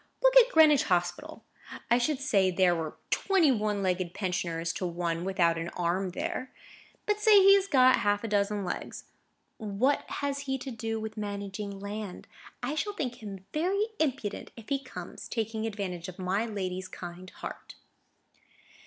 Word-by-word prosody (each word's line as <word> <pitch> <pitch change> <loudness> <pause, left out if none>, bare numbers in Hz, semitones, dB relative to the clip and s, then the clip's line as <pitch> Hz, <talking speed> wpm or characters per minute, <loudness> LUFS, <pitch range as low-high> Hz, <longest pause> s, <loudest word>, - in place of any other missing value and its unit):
Look - - +5
at - - +8
Greenwich 305 -4 +6
Hospital! 180 - -1 0.5
I 240 - +6
should 265 +3 0
say 205 -10 +3
there 185 -1 +3
were 160 -2 -4
twenty 370 -7 +3
one 210 -4 0
legged 180 -2 -1
pensioners 170 -3 -2
to 185 - -3
one 170 -1 -2
without 170 -3 +2
an 165 +1 -3
arm 180 +2 0
there. 255 +7 -4 0.5
But 420 0 +1
say 425 -1 +6
he 395 0 +8
has 395 -1 +3
got 255 -5 +5
half 205 +1 +1
a - - -2
dozen 205 -1 0
legs: 175 - -5 0.5
what 220 +6 0
has 280 -1 -2
he 270 -1 -2
to 265 +1 -7
do 225 -1 -3
with 220 0 -6
managing 200 -1 -5
land? 200 -1 -6 0.4
I 260 +4 -1
shall 415 +7 -2
think 250 - -4
him 195 -3 -8
very 390 +7 +1
impudent 260 -9 -2
if 225 - -12
he 275 -1 0
comes, 260 - -8
taking 225 -1 -2
advantage 190 -5 -4
of 185 - -9
my 195 +4 -1
lady's 185 -3 -4
kind 180 +1 -9
heart." - - -9
210 Hz, 165 wpm, -29 LUFS, 185-270 Hz, 0.5 s, at